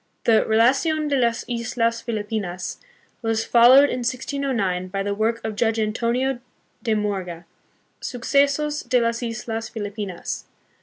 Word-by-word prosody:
The 225 -2 +4
Relacidn 275 +8 +3
de 285 - +1
las 235 -3 +1
Islas 235 -1 -1
Filipinos 210 -5 -4 0.4
was 225 -1 0
followed 255 +4 +7
in - - -2
1609 245 -7 -1
by 195 +1 -3
the 200 0 -1
work 220 +3 0
of 220 -1 -3
Judge 225 0 +1
Antonio 235 +4 0 0.4
de 225 -3 0
Morga, 190 -5 -3 0.6
Sucesos 285 +4 +1
de 250 - +4
las 230 0 0
Islas 225 -1 -4
Filipinas. 205 -4 -5
230 Hz, 125 wpm, -23 LUFS, 210-250 Hz, 0.6 s, followed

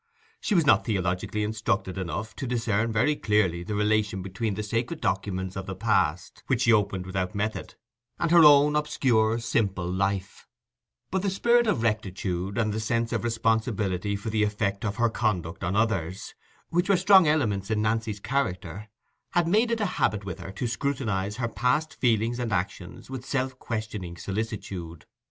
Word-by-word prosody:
She 210 - 0
was 170 -4 +4
not 145 - +5
theologically 95 0 -1
instructed 105 -3 -1
enough 95 +3 -4
to 135 - -4
discern 115 -2 0
very 125 +8 +2
clearly 105 - +1
the 105 +4 -4
relation 105 -2 +1
between 100 +3 -3
the 105 - -3
sacred 115 +9 -2
documents 95 - -2
of 95 -1 -5
the 95 - -4
past 90 -5 0
which 130 -3 +1
she 115 -2 +5
opened 100 -3 +1
without 95 +1 -3
method, 110 +2 -3 0.4
and 170 -1 0
her 170 -1 +8
own 150 0 +7
obscure, 120 -7 +2
simple 100 -6 -1
life; 95 +1 -2 0.6
but 190 - 0
the 200 - 0
spirit 235 +5 +3
of 120 - +1
rectitude, 95 -3 -2
and 110 -3 +1
the 110 - -2
sense 115 +1 -1
of - - -1
responsibility 110 -4 0
for 105 +2 -4
the 110 0 +1
effect 105 -1 -1
of 105 -2 -2
her 120 - +2
conduct 95 -7 -2
on 95 +2 -1
others, 95 -5 -1 0.4
which 175 +3 0
were 195 - +5
strong 190 -1 +6
elements 110 -11 +1
in 110 -1 +1
Nancy's 110 -1 -1
character, 100 - -3 0.4
had 175 -1 +2
made 220 +7 +3
it 230 -1 0
a - - +2 0.2
habit 105 -2 +1
with 95 -1 -6
her 90 +2 -7
to 110 - -3
scrutinize 115 -6 -1
her 120 -1 -1
past 125 +7 0
feelings 115 0 +1
and 120 -3 -2
actions 90 +4 -4
with 130 -2 -5
self 130 -1 -2
questioning 110 -6 -5
solicitude. 95 -5 -5
110 Hz, 175 wpm, -26 LUFS, 95-125 Hz, 0.6 s, her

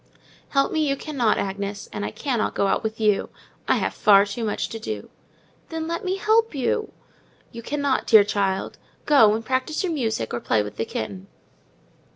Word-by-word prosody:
"Help 275 -1 +2
me 320 - 0
you 275 - +1
cannot, 270 -7 0
Agnes; 200 +1 -4
and 205 - -4
I - - -2
cannot 250 -7 -2
go - - +1
out 195 - +1
with 220 0 -4
you—I 210 -2 -1
have - - -1
far 200 -2 +5
too 205 +3 -5
much 215 - -1
to 225 - -6
do." 105 - -6 0.6
"Then 320 -1 -4
let 335 0 -3
me 370 0 -1
help 440 0 +2
you." 420 - -1 0.6
"You 230 - -8
cannot, 285 +2 0
indeed, - - -15
dear 220 -2 +8
child. 200 -2 -1 0.3
Go 225 -8 +6
and 225 0 -5
practise 260 - -1
your 355 -3 -1
music, 225 - -2
or 120 - -1
play 110 -2 +1
with 105 - -9
the 115 - -1
kitten." 100 -4 -5
225 Hz, 190 wpm, -23 LUFS, 200-285 Hz, 0.6 s, dear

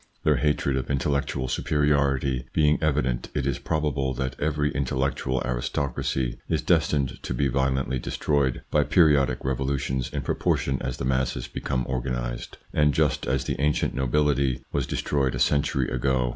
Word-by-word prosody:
Their 75 -3 +3
hatred 70 0 +1
of 65 -1 -3
intellectual 70 -1 0
superiority 70 -3 +1
being 75 -1 +3
evident, 70 -5 0
it 70 -3 0
is 70 -2 -1
probable 75 -4 -1
that 65 0 -3
every 75 -1 0
intellectual 65 -1 -1
aristocracy 65 0 -2
is - - 0
destined 70 -4 +1
to 60 - -3
be 70 +2 +1
violently 65 0 0
destroyed 70 0 0
by - - +4
periodic 70 -7 +3
revolutions, 65 -1 -1
in - - -3
propor - - +1
tion 65 -1 -2
as 65 0 -3
the - - -3
masses 65 0 0
become 65 -2 -2
organised, 60 -1 -3 0.2
and 75 -3 +3
just - - +1
as 65 +1 +1
the 70 - -3
ancient 75 0 +1
nobility 70 0 +1
was 70 -3 -1
destroyed 70 -3 0
a - - -3
century 70 -3 +2
ago. 65 0 +1
65 Hz, 155 wpm, -25 LUFS, 65-70 Hz, 0.2 s, by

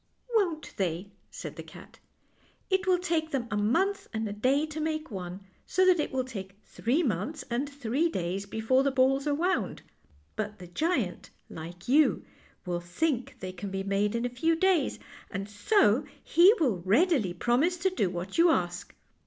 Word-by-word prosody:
"Won't 350 -8 0
they," 185 +1 -2 0.2
said - - -8
the - - -5
cat. - - -14 0.7
"It 380 0 +1
will 365 -1 +5
take 335 -3 -1
them 265 -5 -2
a - - 0
mouth 340 - +1
and 220 -1 -2
a 205 - -4
day 265 +8 +2
to 310 0 -6
make 310 -2 -2
one, 185 -1 -6 0.3
so 375 +1 +3
that 365 -2 +5
it 300 - -1
will 260 -1 0
take 195 -6 -8
three 275 +9 0
mouths 250 - -2
and 265 +4 -1
three 280 +3 0
days 190 - -3
before 225 +5 +2
the 275 - +2
balls 270 +2 +2
are 290 - +2
wound; 320 - -1 0.5
but 210 -1 -3
the 180 - -10
giant, 220 - -1 0.2
like 170 +2 -9
you, 290 +4 +4 0.4
will 175 -1 -2
think 250 - -1
they 185 - -4
can 185 +2 -6
be 195 0 -3
made 200 +2 0
in 235 +1 -1
a 245 0 -5
few 325 +4 +3
days, 370 -1 +2 0.3
and 195 +1 -4
so 215 - +3 0.2
he 345 +5 +6
will 240 - +1
readily 215 - +2
promise 260 - +2
to 380 +2 +1
do 205 - 0
what 180 - -4
you 340 +1 +7
ask. 180 - -1
250 Hz, 180 wpm, -29 LUFS, 195-320 Hz, 0.7 s, you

